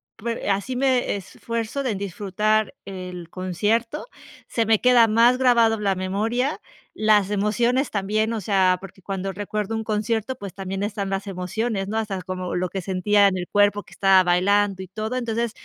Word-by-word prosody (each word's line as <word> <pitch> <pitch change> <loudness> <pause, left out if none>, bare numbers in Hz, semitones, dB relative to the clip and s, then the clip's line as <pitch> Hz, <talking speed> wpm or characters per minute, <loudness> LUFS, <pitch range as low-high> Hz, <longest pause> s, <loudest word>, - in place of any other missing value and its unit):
pue 230 -1 -4
así 200 +6 -1
me 255 -4 +1
esfuerzo 230 +6 -4
de 250 -5 0
disfrutar 205 +2 0
el 180 -3 -7
concierto, 215 - -1 0.4
se 230 -1 0
me 220 -1 +3
queda 245 -2 +6
más 235 +3 +4
grabado 235 -3 +4
en 210 - -6
la 195 -1 +2
memoria, 225 - -1 0.4
las 210 -2 +3
emociones 235 +6 +1
también, 215 +3 0
o 220 - -3
sea, 185 -2 +3
porque 195 0 -12
cuando 195 0 -3
recuerdo 210 +2 -3
un 220 - -2
concierto, 220 +3 -1
pues 200 -7 -8
también 195 0 -4
están 205 -1 -3
las 195 +1 -3
emociones, 195 +2 -2
¿no? 220 - -2
Hasta 195 -4 -3
como 185 -1 -4
lo 180 0 -1
que 190 +2 -4
sentía 200 +2 +3
en 185 -1 0
el 180 - -4
cuerpo 205 0 +2
que 195 - -17
estaba 190 +1 +5
bailando 190 +2 +2
y 190 - -7
todo. 215 +6 -4
Entonces, 235 -1 -1
205 Hz, 175 wpm, -23 LUFS, 190-225 Hz, 0.4 s, queda